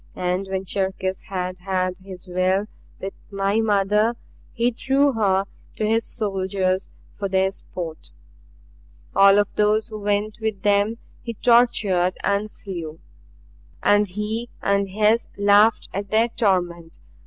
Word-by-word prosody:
And 180 +2 -1
when 190 0 -3
Cherkis 190 0 -2
had 185 -1 -3
had 185 0 -2
his 185 -1 -10
will 185 +2 +1 0.3
with 195 +1 -5 0.2
my 200 +1 0
mother 210 +2 +2 0.4
he 235 +2 +1
threw 275 +4 +2
her 195 -4 +2 0.3
to 215 - -1
his 225 +1 +1
soldiers 190 -3 -1 0.3
for 200 -1 -2
their 190 0 +2
sport. 170 -4 -8 1.1
"All 195 0 +7
of 205 0 +3
those 215 +2 +2
who 215 -1 -7
went 205 +2 -1
with 220 -3 -3
them 205 +2 +2 0.2
he 230 - -6
tortured 210 -6 +3
and 200 +1 0
slew 165 -5 -7 0.8
and 205 0 +4
he 210 +5 -4
and 200 0 +1
his 215 +4 +2
laughed 205 +2 +4
at 200 +1 -4
their 225 +3 +3
torment. 175 -7 -1
200 Hz, 130 wpm, -23 LUFS, 190-215 Hz, 1.1 s, All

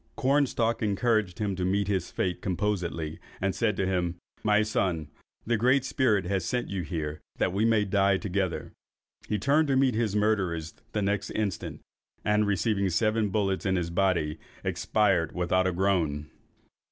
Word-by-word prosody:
Cornstalk 130 -4 +1
encouraged 110 -3 +1
him 100 -3 -1
to 90 - -3
meet 100 +2 +1
hits 95 -4 -1
fate 90 -1 -2
composedly, 90 -5 -2 0.2
and 95 0 0
said 110 -4 0
to 95 - +1
him, 90 -2 0 0.3
"My 105 0 +4
son, 90 -8 -1 0.4
the 120 0 +1
Great 130 +4 +3
Spirit 110 -9 +2
has 95 0 0
sent 125 +7 -2
you 95 -2 -2
here 75 -3 -4 0.2
that 90 - +1
we 105 +3 +2
may 110 -2 +3
die 100 0 +3
together!" 95 -3 -2 0.6
He 105 - +1
turned 145 +9 +3
to 135 - +2
meet 130 -1 +3
his 110 -2 0
murderers 95 -7 0 0.2
the 105 - 0
next 100 0 0
instant, 100 -6 -3 0.4
and 105 0 +3
receiving 100 0 +1
seven 110 +4 +1
bullets 95 -1 0
in 95 -1 +1
his 85 -2 -1
body, 85 -4 +1 0.2
expired 95 -7 +1
without 95 +1 +2
a - - +1
groan. 85 -6 0
100 Hz, 165 wpm, -28 LUFS, 90-110 Hz, 0.6 s, My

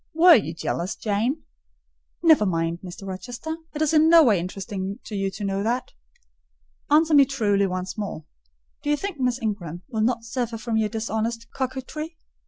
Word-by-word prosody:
Were 345 +2 +8
you 170 - +2
jealous, 175 +3 -2
Jane?" 230 +8 -1 0.8
"Never 315 -9 +6
mind, 165 -1 -1
Mr. 185 +2 -8
Rochester: 245 - -5 0.2
it 305 - +1
is 310 - +1
in 315 +1 +5
no 335 -1 +8
way 215 - +4
interesting 195 +2 -4
to 215 - -7
you 195 -1 0
to 205 - -7
know 195 0 -1
that. 240 +4 -1 1.0
Answer 315 +2 +4
me 285 -1 +8
truly 210 -8 +1
once 185 +2 -4
more. 195 -7 -5 0.6
Do 290 - -3
you 295 - +3
think 390 -3 -5
Miss 250 -1 +1
Ingram 185 -7 -4
will 220 -4 -2
not 235 +1 +1
suffer 230 0 -3
from 225 +1 -3
your 215 -1 +1
dishonest 225 +1 -2
coquetry? 270 +5 -4
225 Hz, 175 wpm, -24 LUFS, 195-275 Hz, 1.0 s, Were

